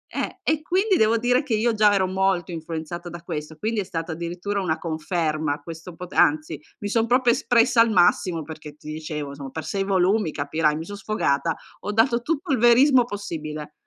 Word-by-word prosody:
Eh, - - -3
e 310 -1 +1
quindi 380 +5 +1
devo 220 +1 +3
dire 245 +3 +2
che 255 -6 -1
io 230 +2 +1
già 210 -1 +4
ero 195 -2 +2
molto 185 -2 0
influenzata 165 +1 -6
da 170 0 -9
questo, 155 -2 -6
quindi 220 +4 -2
è - - 0
stata 165 -2 -5
addirittura 175 +5 -3
una 160 -3 -1
conferma 155 -2 -2
questo 165 +1 -9
po 180 - -7
anzi, 155 0 +2 0.2
mi 205 - -3
son 225 +1 +1
proprio 245 -1 +4
espressa 240 -3 +3
al 230 - +4
massimo, 175 -3 +3
perché 155 -1 -10
ti 155 - -9
dicevo, 155 -2 -5
insom 140 -1 -8
per 160 +2 -6
6 195 -1 -1
volumi, 195 0 +2
capirai, 150 +1 0
mi 160 - -5
son 205 +1 -7
sfogata, 165 -7 0 0.3
ho 205 - -3
dato 235 +2 +2
tutto 320 +4 -2
il 255 - +2
verismo 245 +2 +6
possibile. 155 -8 -6
180 Hz, 195 wpm, -24 LUFS, 160-225 Hz, 0.3 s, verismo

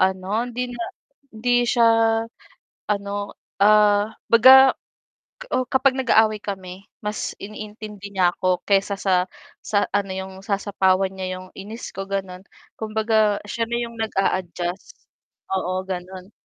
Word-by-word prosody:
ano 190 +4 +1
hindi 245 +1 -4
na 235 - -4 0.5
hindi 245 +2 +2
siya 235 -1 +4 1.1
ano, 200 0 -3 0.3
ah, 210 0 +5 0.2
'baga, 260 +3 +8 0.8
uh, 255 - +1
kapag 265 0 +3
nag-aaway 220 -3 +4
kami 190 -1 -7 0.2
mas 210 0 -3
iniintindi 210 -1 -8
niya 180 -2 +3
ako 185 -1 0
kaysa 200 0 +2
sa 185 -2 +2 0.4
sa 205 -1 +1
ano 200 -1 0
'yong 190 0 -6
sasapawan 195 -1 +1
niya 185 -1 -4
yung 185 - -12
inis 215 +4 -8
ko, 195 - -4
ganon, 190 -2 -4 0.4
kumbaga 220 -1 +1
siya 230 +2 -1
na 235 - 0
'yong 235 -1 -5
nag-aadjust 185 -4 -2 0.6
oo 185 0 -1
ganon. 185 +1 -6
205 Hz, 125 wpm, -22 LUFS, 190-220 Hz, 1.1 s, baga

